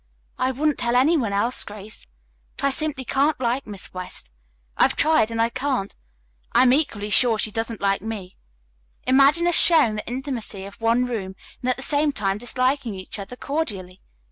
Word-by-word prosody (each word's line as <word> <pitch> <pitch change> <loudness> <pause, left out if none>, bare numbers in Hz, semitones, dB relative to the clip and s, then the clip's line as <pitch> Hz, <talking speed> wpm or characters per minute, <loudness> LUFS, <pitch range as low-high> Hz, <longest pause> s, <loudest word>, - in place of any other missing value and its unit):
"I 255 - +1
wouldn't 290 +3 0
tell 240 0 0
any 275 +7 +4
one 235 -9 0
else, 220 +5 +1
Grace, 210 - -9 0.5
but - - -2
I - - +4
simply 290 -2 -3
can't 285 +3 +1
like 250 +1 -1
Miss 200 -3 -6
West. 180 - -6 0.4
I've - - +3
tried, 310 -7 +3
and 230 0 -4
I 230 0 +3
can't. 255 -5 -2 0.6
I - - +6
am 250 -1 +5
equally 215 -8 -1
sure 235 0 +4
she 215 - 0
doesn't 225 0 -3
like 195 -1 +1
me. 205 -4 -6 0.7
Imagine 275 +6 +4
us 350 - +2
sharing 315 -10 +6
the 210 - -6
intimacy 240 -6 -3
of 200 +3 -12
one 230 +2 +2
room, 200 -6 -4 0.3
and 255 - -1
at 255 - +2
the 265 - -3
same 295 +1 +2
time 195 -2 -1
disliking 255 -1 0
each 185 +2 -7
other 200 +5 -7
cordially. 205 - -4
240 Hz, 185 wpm, -23 LUFS, 205-275 Hz, 0.7 s, I